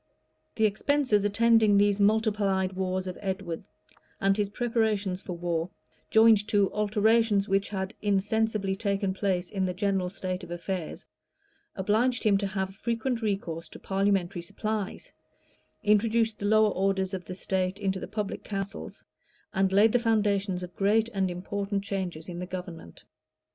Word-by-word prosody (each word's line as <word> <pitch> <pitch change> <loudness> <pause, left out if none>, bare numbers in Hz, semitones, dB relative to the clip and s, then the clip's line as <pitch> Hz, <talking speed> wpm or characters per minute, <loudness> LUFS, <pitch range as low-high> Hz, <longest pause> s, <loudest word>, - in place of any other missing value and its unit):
The 220 - +3
expenses 215 0 +2
attending 220 0 +4
these 205 0 +3
multiplied 200 -3 +2
wars 185 0 -2
of 185 -1 -6
Edward, 190 -4 -4 0.6
and 195 0 +3
his 205 -1 0
preparations 215 -5 0
for 185 - -6
war, 170 0 -2 0.4
joined 220 -2 +5
to 205 -3 +2
alterations 210 0 +2
which 195 +1 +1
had 190 0 -3
insensibly 205 0 0
taken 200 -1 -1
place 185 -2 -1
in 195 -2 -1
the 180 -1 -2
general 195 -2 0
state 185 0 -4
of 175 - -9
affairs, 175 0 -5 0.7
obliged 220 +6 +1
him 210 -3 +4
to 200 - -1
have 190 -1 -3
frequent 235 +2 -2
recourse 195 -6 -3
to - - -11
parliamentary 195 -3 0
supplies, 205 +3 -4 0.7
introduced 220 +1 +2
the 205 - -3
lower 215 0 +4
orders 190 0 0
of 185 -2 -4
the 185 - -6
state 185 0 -1
into 195 -2 -1
the - - -6
public 210 -1 -4
councils, 195 - -6 0.5
and 190 0 +2
laid 205 +3 +5
the 245 - +3
foundations 205 -5 +1
of 180 0 -9
great 215 +3 +2
and 195 -4 0
important 195 +3 -3
changes 185 -5 -4
in 175 -1 -6
the 180 - -5
government. 180 - -8
200 Hz, 150 wpm, -28 LUFS, 190-215 Hz, 0.7 s, joined